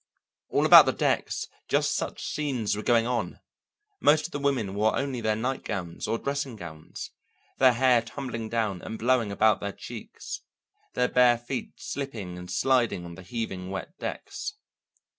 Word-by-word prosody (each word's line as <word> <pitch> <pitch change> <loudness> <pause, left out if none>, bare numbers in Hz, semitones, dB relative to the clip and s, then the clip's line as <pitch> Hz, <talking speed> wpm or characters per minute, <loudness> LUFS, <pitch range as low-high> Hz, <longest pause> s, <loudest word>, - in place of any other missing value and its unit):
All - - +2
about - - +10
the - - +2
decks - - 0 0.2
just - - +2
such - - -3
scenes 130 -9 -1
were 105 - -3
going 115 0 +3
on; 120 0 -2 0.6
most 155 +1 +4
of - - -6
the 145 - -3
women 130 -9 0
wore 105 +2 +2
only 135 -3 -2
their 110 -1 +1
night 125 +5 -2
gowns 85 -4 -4
or 115 - 0
dressing 140 -1 -3
gowns, 80 -6 -8 0.5
their 130 -2 +7
hair 125 -1 +4
tumbling 115 -2 -5
down 110 -6 -1
and 110 - -6
blowing 120 -3 +2
about 105 +1 +3
their 100 - -3
cheeks, - - -8 0.5
their 125 0 +3
bare 125 -1 +5
feet 120 +2 -5
slipping 115 -11 -5
and 90 0 -9
sliding 120 -4 +2
on 85 - -8
the 95 - -10
heaving 95 -2 -4
wet 95 0 -5
decks. - - -5
115 Hz, 165 wpm, -27 LUFS, 100-130 Hz, 0.6 s, about